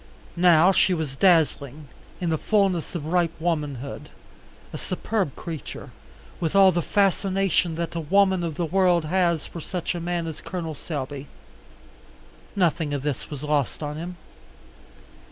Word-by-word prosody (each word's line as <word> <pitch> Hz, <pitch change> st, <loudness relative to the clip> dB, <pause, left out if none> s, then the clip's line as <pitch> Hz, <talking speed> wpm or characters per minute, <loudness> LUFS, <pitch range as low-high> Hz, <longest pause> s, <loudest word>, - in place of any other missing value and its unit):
Now 175 Hz, 0 st, +6 dB
she 185 Hz, -1 st, +3 dB
was 155 Hz, -5 st, -3 dB
dazzling, 150 Hz, -4 st, +2 dB, 0.3 s
in 175 Hz, -2 st, -1 dB
the 160 Hz, -, +1 dB
fullness 195 Hz, -6 st, +1 dB
of 155 Hz, -4 st, -4 dB
ripe 170 Hz, 0 st, 0 dB
womanhood, 150 Hz, -5 st, -3 dB, 0.6 s
a -, -, -3 dB
superb 190 Hz, -, -2 dB
creature, 165 Hz, -3 st, -7 dB, 0.5 s
with 165 Hz, +2 st, -2 dB
all 195 Hz, -1 st, +7 dB
the 175 Hz, 0 st, 0 dB
fascination 195 Hz, -2 st, +1 dB
that 170 Hz, 0 st, -3 dB
a 170 Hz, -, -2 dB
woman 190 Hz, +3 st, +3 dB
of 165 Hz, -3 st, -3 dB
the 175 Hz, -, -1 dB
world 175 Hz, -1 st, +2 dB
has 170 Hz, -1 st, +1 dB
for 170 Hz, -, -8 dB
such 180 Hz, +2 st, -3 dB
a 175 Hz, -, -4 dB
man 170 Hz, 0 st, -2 dB
as 160 Hz, -2 st, -6 dB
Col. 170 Hz, -4 st, -5 dB
Selby. 145 Hz, -2 st, -5 dB, 1.3 s
Nothing 165 Hz, -5 st, +1 dB
of 140 Hz, -, -4 dB
this 145 Hz, -3 st, -3 dB
was 145 Hz, -2 st, -7 dB
lost 150 Hz, 0 st, -1 dB
on 150 Hz, 0 st, -4 dB
him. 175 Hz, +2 st, -6 dB
170 Hz, 150 wpm, -24 LUFS, 150-180 Hz, 1.3 s, all